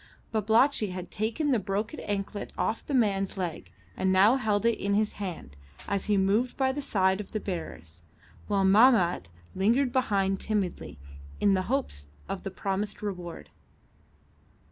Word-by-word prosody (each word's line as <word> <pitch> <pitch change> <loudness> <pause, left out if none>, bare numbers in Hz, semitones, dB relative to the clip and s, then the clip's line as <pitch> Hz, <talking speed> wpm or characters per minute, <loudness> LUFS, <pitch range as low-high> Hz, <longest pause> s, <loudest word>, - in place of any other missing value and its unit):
Babalatchi 220 +3 +3
had 180 -1 -7
taken 230 +8 -1
the 245 - +3
broken 210 +8 -3
anklet 205 0 -4
off 225 - -1
the 285 - -3
man's 195 -5 +1
leg, 165 - -4 0.2
and 190 - +1
now 200 +6 +6
held 215 -4 0
it 235 -1 +2
in 200 0 0
his 210 0 +1
hand 165 - -6 0.3
as 200 -1 -1
he 210 -1 +2
moved 205 +6 +1
by 265 -1 +2
the 290 +2 -4
side 190 -5 +1
of 200 - -13
the 215 - -1
bearers, 85 - -7 0.5
while 200 -2 +2
Mahmat 190 - +4 0.2
lingered 235 +7 +2
behind 195 -6 +1
timidly, 200 - -2 0.4
in 200 - +4
the 190 - +2
hopes 250 - -2 0.2
of 195 - -4
the 195 - -4
promised 195 +2 -3
reward. 180 -4 -6
200 Hz, 155 wpm, -28 LUFS, 190-225 Hz, 0.5 s, now